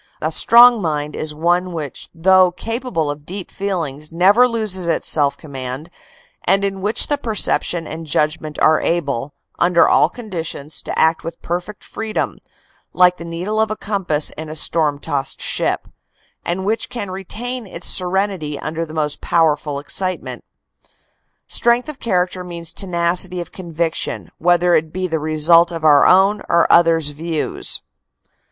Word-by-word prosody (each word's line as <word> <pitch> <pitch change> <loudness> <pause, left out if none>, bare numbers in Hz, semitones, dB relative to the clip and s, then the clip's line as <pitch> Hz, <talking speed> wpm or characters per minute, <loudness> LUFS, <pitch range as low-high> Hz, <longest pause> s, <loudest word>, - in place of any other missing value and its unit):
A 155 - -2
strong 235 +7 +6
mind 150 -3 -2
is 155 - -2
one 175 +4 0
which 150 -5 -6
though 185 +2 +4
capable 225 - -3
of 145 0 -9
deep 185 +3 -7
feelings 160 -7 -4
never 200 +9 +5
loses 215 -7 -2
its 165 - 0
self 145 -2 +2
command 135 +2 -7 0.5
and 195 +2 +2
in 195 -1 -3
which 210 +3 +1
the 290 -1 -1
perception 205 - 0
and 160 +1 -7
judgment 150 +1 -1
are 155 0 +4
able, 140 -5 -2 0.2
under 175 -1 +4
all 155 - +4
conditions, 165 - -6
to - - -5
act 160 +1 +3
with 165 0 -7
perfect 180 +4 -4
freedom, 220 -1 -4 0.5
like 180 0 +4
the - - -8
needle 180 +6 -2
of 220 - +1
a 215 - -2
compass 190 -9 -1
in 155 0 -8
a 155 - -6
storm 155 -2 +1
tossed 140 -1 -3
ship, - - -1 0.6
and 185 +2 -3
which 220 +3 -1
can 205 -6 -5
retain 225 +5 -6
its 175 -1 -7
serenity 185 -5 0
under 165 +3 -4
the 155 - -10
most 150 -1 -1
powerful 150 -3 +1
excitement. 185 +6 -4 1.0
Strength 240 +4 +2
of 290 -2 -7
character 180 -3 -1
means 170 -2 -7
tenacity 180 -1 +1
of 175 - -7
convic 170 -2 -3
tion, - - -4
whether 175 +1 +3
it 155 -1 +1
be 185 +2 -3
the 165 -3 -1
result 155 +3 +4
of 165 -2 -6
our 150 -2 +6
own 195 +3 +4
or 170 0 +4
others 165 -3 +4
views." 160 +1 -2
170 Hz, 155 wpm, -19 LUFS, 155-190 Hz, 1.0 s, strong